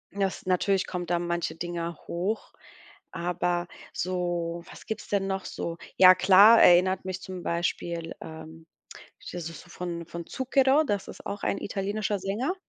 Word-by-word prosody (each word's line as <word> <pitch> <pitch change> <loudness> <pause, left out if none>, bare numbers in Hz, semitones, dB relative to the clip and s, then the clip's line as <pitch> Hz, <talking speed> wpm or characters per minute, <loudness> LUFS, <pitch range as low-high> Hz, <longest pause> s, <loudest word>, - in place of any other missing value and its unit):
das 195 -2 -2
natürlich 185 +1 +2
kommt 175 -1 -5
da 175 - +2
manche 170 -1 -2
Dinger 170 -1 -4
hoch, 190 +6 -3 0.6
aber 175 0 -1 0.3
so 175 -2 -2
was - - -12
gibt's 220 -1 -5
denn 200 -1 0
noch 190 0 -2
so? 170 - -4 0.2
Ja 185 0 +10
klar, 195 +5 +7
erinnert 185 +1 +5
mich 185 0 -4
zum 185 -1 -7
Beispiel, 170 -1 -2
ähm 160 +1 -10 0.5
das - - -9 0.2
ist 165 - -10
so - - -17
von 170 -2 -5
von 170 0 -7
Zucchero, 265 +2 +3
das 200 -6 -2
ist - - -11
auch 200 +1 -5
ein - - 0
italienischer 205 +1 -2
Sänger. 215 - -1
180 Hz, 155 wpm, -27 LUFS, 170-195 Hz, 0.6 s, Ja